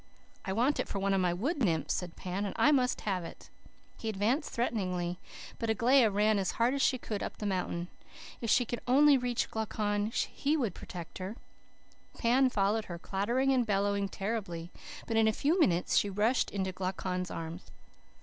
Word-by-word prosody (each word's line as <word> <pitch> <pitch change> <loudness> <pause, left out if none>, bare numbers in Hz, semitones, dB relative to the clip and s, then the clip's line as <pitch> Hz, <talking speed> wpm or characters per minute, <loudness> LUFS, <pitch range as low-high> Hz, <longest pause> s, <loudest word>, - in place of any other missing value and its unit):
"'I 190 - -1
want 250 +8 +2
it - - -1
for - - -4
one 195 0 +1
of 195 - +2
my 180 -1 +2
wood 270 - -1
nymphs,' 165 - +1
said 180 -2 -4
Pan, 185 +2 -3
'and 200 - -4
I 295 - +5
must 255 -3 +2
have 190 -4 -1
it.' 165 - -11 0.5
"He 225 - -3
advanced 220 +9 0
threateningly, 185 -7 -2 0.4
but 230 - -2
Aglaia 235 +2 +4
ran 210 +1 +2
as 190 - -1
hard 235 +3 +2
as 280 - -1
she 260 - +3
could 215 -4 -5
up - - -5
the 210 - -5
mountain. 180 -3 -2 0.5
If 230 - -2
she 245 +3 +4
could 240 - -4
only 285 +3 +6
reach 245 -2 -1
Glaucon 210 -1 -1
he 285 +6 -1
would 235 - -1
protect 175 -1 -8
her. 190 +4 -5 0.8
Pan 255 +2 +3
followed 210 -1 +1
her, 175 - -6
clattering 235 +10 0
and 255 -2 +3
bellowing 200 -1 0
terribly, 195 -6 -4 0.3
but 225 - -1
in 220 0 +5
a - - +4
few 305 - +1
minutes 180 - +3
she 205 - +3
rushed 215 +6 +1
into 190 -2 -2
Glaucon's 185 0 -3
arms. 165 +2 -6
210 Hz, 190 wpm, -31 LUFS, 185-240 Hz, 0.8 s, only